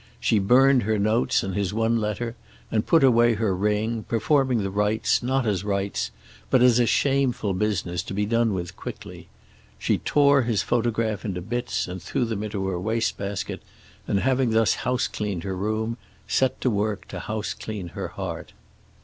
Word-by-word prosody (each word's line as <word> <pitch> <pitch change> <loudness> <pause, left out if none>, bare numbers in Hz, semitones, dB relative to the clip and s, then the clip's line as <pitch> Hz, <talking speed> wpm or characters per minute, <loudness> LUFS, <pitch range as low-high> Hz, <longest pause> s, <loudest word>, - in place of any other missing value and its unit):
She 110 - +2
burned 130 +6 +5
her 110 0 0
notes 110 +4 +2
and 95 - -3
his 100 +1 -1
one 115 +1 +2
letter 110 +3 -3 0.4
and 110 -1 0
put 165 -4 +5
away 120 -2 +5
her 105 -3 0
ring, 105 +3 0
performing 125 +1 +1
the 95 - -2
rites 105 +2 +1
not 130 +1 0
as 100 -4 0
rites 100 -1 -1 0.4
but 130 -2 +4
as 125 -1 +5
a 120 - +3
shameful 135 -6 +1
business 90 -3 -1
to - - -6
be 105 +1 0
done 115 -1 +1
with 85 -2 -5
quickly. - - -9 0.5
She - - 0
tore 140 -1 +4
his 115 -4 0
photograph 115 -2 0
into 95 -5 -3
bits 120 +4 -2
and 90 0 -6
threw 125 - -1
them 110 -3 -3
into 105 -2 -3
her 90 -2 -2
waste 110 +4 0
basket, 100 -1 -4 0.5
and 100 - +1
having 130 -1 +2
thus 110 -1 +3
housecleaned 105 -7 -2
her 95 -1 -3
room 110 +4 -2 0.3
set 130 -1 +1
to 125 - +2
work 105 -1 -2
to 90 - -6
houseclean 105 -1 -5
her - - -4
heart. - - -6
110 Hz, 175 wpm, -25 LUFS, 100-120 Hz, 0.5 s, burned